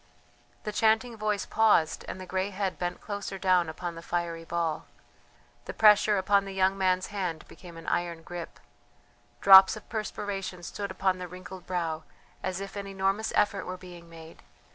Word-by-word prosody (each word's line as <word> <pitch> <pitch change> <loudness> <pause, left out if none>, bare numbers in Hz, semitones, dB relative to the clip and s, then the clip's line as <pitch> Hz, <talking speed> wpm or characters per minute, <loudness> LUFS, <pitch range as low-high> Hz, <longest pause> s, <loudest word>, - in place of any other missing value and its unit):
The 210 - -3
chanting 220 +3 +2
voice 210 -2 -1
paused 210 -8 +2
and - - -6
the 185 - -7
grey 190 +1 -1
head 195 -1 -3
bent 175 0 -3
closer 200 -2 -5
down 185 -3 +2
upon 170 +2 -5
the 165 - -9
fiery 170 -1 -3
ball; 165 -2 -2 0.8
the - - -7
pressure 210 -1 +6
upon 200 +1 +3
the 195 0 -7
young 190 0 +3
man's 185 -1 +1
hand 180 -6 -3
became 175 -2 -13
an 165 - -10
iron 170 -1 -2
grip. 175 0 -8 0.8
Drops 190 +1 +9
of 215 - -13
perspiration 200 -4 -4
stood 200 +3 -5
upon 190 0 0
the 180 - -5
wrinkled 185 +1 -10
brow 165 -3 -2 0.4
as 185 -1 -3
if 195 0 -7
an 200 -1 -5
enormous 195 +2 -1
effort 205 -1 +1
were 185 0 -5
being 175 -2 -12
made. 165 0 -13
185 Hz, 170 wpm, -28 LUFS, 175-200 Hz, 0.8 s, Drops